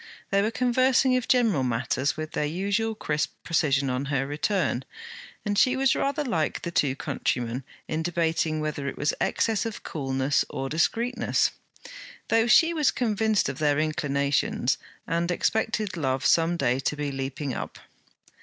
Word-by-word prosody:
They 200 0 +3
were 210 - +1
conversing 255 +2 +3
of 250 -1 -1
general 230 - +3
matters 130 +3 0
with 155 0 -5
their - - -1
usual 200 +7 -1
crisp 150 -7 -2
precision 140 -4 +1
on 125 +2 -2
her 135 -1 0
return, 145 -1 -1 0.6
and 205 -1 0
she 255 0 +4
was 265 0 +3
rather 280 +2 0
like 165 - -1
the 170 - -3
two 140 -5 +1
countrymen, 125 -3 -2 0.2
in 155 +1 -2
debating 165 -2 0
whether 150 -2 -3
it - - -4
was 150 - +1
excess 225 -2 +1
of 225 -2 -5
coolness 135 -1 0
or 135 0 -4
discreetness; 235 - +1 0.8
though 225 +1 +3
she 330 +7 +5
was 305 -4 +3
convinced 220 -3 +1
of - - -5
their 145 -2 +2
inclinations, 140 -2 0 0.3
and 170 +1 -1
expected 215 +1 0
love 135 -4 -1
some 170 +1 +3
day 130 -3 +1
to 135 - -1
be 145 -1 -3
leaping 135 0 -4
up. - - -6
160 Hz, 155 wpm, -26 LUFS, 140-220 Hz, 0.8 s, she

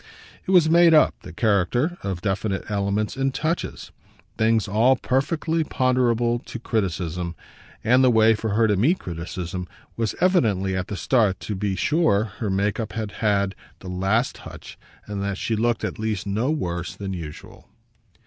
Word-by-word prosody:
It - - -5
was 180 -4 +5
made 170 0 +6
up, 155 - +5
the - - -10
character, 115 - +1
of 95 -3 -4
definite 95 0 -1
elements 100 +1 -1
and 135 0 0
touches 160 +5 -3 0.4
things 110 -1 +2
all 115 +6 +4
perfectly 160 +6 0
ponderable 120 -4 +1
to 120 - -8
criticism; 90 -6 -2 0.5
and 125 +4 +4
the 130 - +6
way 110 -1 +5
for 110 -1 -2
her 115 0 +4
to 105 - +2
meet 140 - +3
criticism 90 - -5 0.3
was 115 -2 -2
evidently 110 - +2
at 95 0 -2
the 100 - -5
start 100 +1 +2
to 105 - -4
be 100 0 -2
sure 150 - +2 0.2
her 110 - -2
make 100 +2 0
up 110 - -4
had 110 -2 -4
had 100 -3 +1 0.2
the 95 - -10
last 95 +7 0
touch - - -11 0.3
and 100 -1 -5
that 100 -1 -2
she 115 - -1
looked 115 +1 0
at - - -3
least 110 -3 -2
no 105 +7 -1
worse 90 - -3
than 100 -1 -5
usual. 80 -4 -9
110 Hz, 170 wpm, -23 LUFS, 95-125 Hz, 0.5 s, made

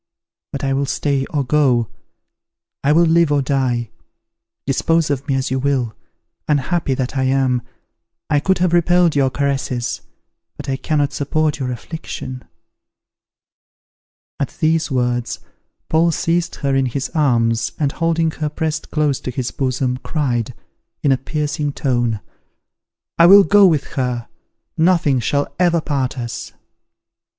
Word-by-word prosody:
But 140 - -5
I 135 0 +1
will 140 +1 0
stay 140 -2 -1
or 145 -2 -1
go, 125 -4 +2 1.0
I 140 - +3
will 170 +3 +5
live 165 -1 +3
or 145 -1 +2
die, 130 -4 -1 0.7
dispose 160 +3 +1
of 140 +1 -3
me 135 - +1
as 130 -1 -1
you 130 - 0
will. 130 -5 0 0.5
Unhappy 150 0 0
that 130 +1 -3
I 130 -1 +1
am! 130 -2 +1 0.7
I 150 - +2
could 190 +6 +1
have 175 -1 +1
repelled 175 -1 +3
your 135 -2 +3
caresses; 135 -3 -2 0.6
but 145 - -8
I 135 - 0
cannot 145 -1 0
support 150 +1 0
your 130 -2 -2
affliction." 130 -1 -7 2.0
At 140 -4 -3
these 160 0 +1
words 125 -2 -1 0.5
Paul 165 +2 +3
seized 170 +1 -1
her 140 -2 -1
in 135 -1 +2
his 135 +2 -3
arms, 115 -7 +1
and, 145 -3 0
holding 165 0 0
her 155 -1 -3
pressed 155 0 -3
close 150 -3 0
to - - -6
his 125 0 -3
bosom, 130 -1 -1
cried, 125 -5 -2 0.5
in 140 - +3
a 135 - +3
piercing 150 +1 -2
tone, 120 -7 0 1.0
"I 170 - +8
will 200 +2 +9
go 205 0 +6
with 155 -5 +2
her, 125 -3 -2 0.5
nothing 160 -6 +3
shall 140 +5 -1
ever 175 -2 +3
part 140 -4 -2
us." 120 -2 -5
140 Hz, 140 wpm, -19 LUFS, 130-160 Hz, 2.0 s, will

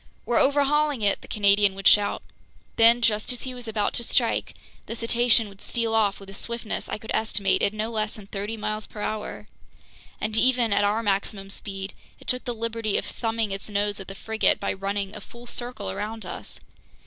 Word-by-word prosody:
"We're 240 - +2
overhauling 285 -2 +3
it!" 200 -1 +2
the - - -12
Canadian 200 -1 +4
would 195 0 +1
shout. 205 -1 +5 0.5
Then, 235 +1 +6
just 215 0 +2
as 245 - -3
he 260 - -4
was 245 -2 -4
about 215 -2 0
to 235 - 0
strike, - - +1 0.3
the 230 - -4
cetacean 235 -1 +4
would 195 -1 -14
steal 230 -1 -1
off 210 -3 +3
with 195 - -12
a - - -10
swiftness 235 +2 -3
I - - -2
could 220 +1 -8
estimate 205 -3 +2
at - - +3
no 215 +2 -3
less 215 -1 -1
than 210 - -8
thirty 205 +2 -4
miles 215 0 -3
per 210 - -9
hour. 215 0 -4 0.7
And 215 +1 -1
even 240 -2 +3
at 205 - +3
our 210 +3 +1
maximum 195 -1 -1
speed, 195 -1 -5 0.3
it - - -16
took 250 0 -1
the 245 -2 -3
liberty 225 -2 -1
of - - -2
thumbing 225 -2 -2
its 195 +2 -4
nose 205 0 0
at 195 - -8
the 195 - -7
frigate 220 +2 +1
by - - -1
running 195 +1 -3
a - - -8
full 240 0 -13
circle 240 - -4
around 220 - -5
us! - - -7
215 Hz, 205 wpm, -25 LUFS, 200-230 Hz, 0.7 s, Then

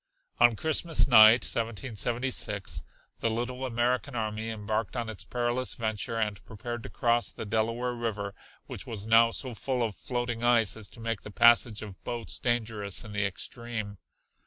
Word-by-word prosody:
On 120 -1 +6
Christmas 160 +5 +2
night, 115 -1 +8
1776, 115 -2 -1 0.4
the 115 - 0
little 125 +3 -3
American 125 +3 0
army 110 0 -2
embarked 110 +1 -3
on 115 -2 -2
its 110 - -2
perilous 120 +1 -2
venture, 110 0 -2
and 105 -2 -2
prepared 120 +2 -6
to - - -8
cross 120 0 +1
the - - -7
Delaware 115 +3 0
River 105 -4 -3 0.3
which - - -8
was 105 -3 -4
now 115 +1 +6
so 125 +2 -2
full 125 +2 -1
of 110 -2 -2
floating 120 0 -3
ice 120 -3 +4
as 110 -2 -6
to - - -14
make 115 -2 -3
the - - -9
passage 115 0 +4
of 100 -4 -11
boats 120 -2 -4
dangerous 110 -5 -1
in 110 - -9
the 105 -1 +1
extreme. 110 0 -5
115 Hz, 160 wpm, -28 LUFS, 110-120 Hz, 0.4 s, night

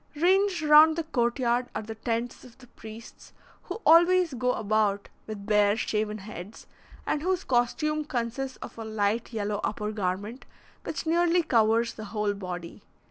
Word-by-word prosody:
Ranged 370 +2 +2
round 305 +1 +7
the 330 - -2
court 240 -7 0
yard 245 -1 0
are - - -3
the 220 +1 -7
tents 230 +2 -3
of 245 -2 -16
the 260 - -16
priests, 225 -1 -13 0.3
who 455 - -6
always 345 0 +5
go 250 0 0
about 205 -1 0 0.2
with 210 -2 -7
bare, 210 0 +3
shaven 215 -1 -2
heads, 200 0 -10 0.4
and 295 - -1
whose 370 +2 -1
costume 300 +5 0
consists 260 +1 -3
of - - -10
a - - -4
light 220 +1 -1
yellow 210 -2 -2
upper 210 0 -2
garment, 205 +4 -4 0.4
which 325 - -4
nearly 345 +1 +2
covers 230 -2 +2
the 215 - -8
whole 210 0 -1
body. 180 -3 -7
230 Hz, 160 wpm, -27 LUFS, 210-300 Hz, 0.4 s, round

